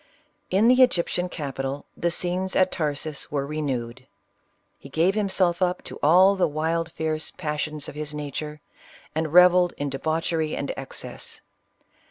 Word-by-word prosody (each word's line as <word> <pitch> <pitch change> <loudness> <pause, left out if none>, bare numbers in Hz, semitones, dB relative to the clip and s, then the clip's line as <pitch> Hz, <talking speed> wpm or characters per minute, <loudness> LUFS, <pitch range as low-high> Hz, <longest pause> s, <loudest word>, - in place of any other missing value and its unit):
In 200 +5 +3
the 255 +1 +6
Egyptian 180 -6 +2
capital 140 -3 -4
the 170 - 0
scenes 180 +2 -2
at 185 0 +3
Tarsus 150 -2 -3
were 140 -2 -1
renewed. 130 -5 -4 0.7
He 140 - -12
gave 165 +7 +2
himself 190 -4 +2
up 180 -1 +1
to - - -8
all 185 +6 +6
the 190 - +2
wild, 160 +2 -1
fierce 155 0 -2
passions 150 -1 -4
of - - -7
his 150 0 -3
nature, 150 0 -5 0.5
and 160 -1 -1
rev 180 +2 +8
elled 180 -1 +3
in 145 -1 -3
debauchery 160 +2 -1
and 140 - -3
excess. 135 - -6
160 Hz, 150 wpm, -25 LUFS, 145-180 Hz, 0.7 s, rev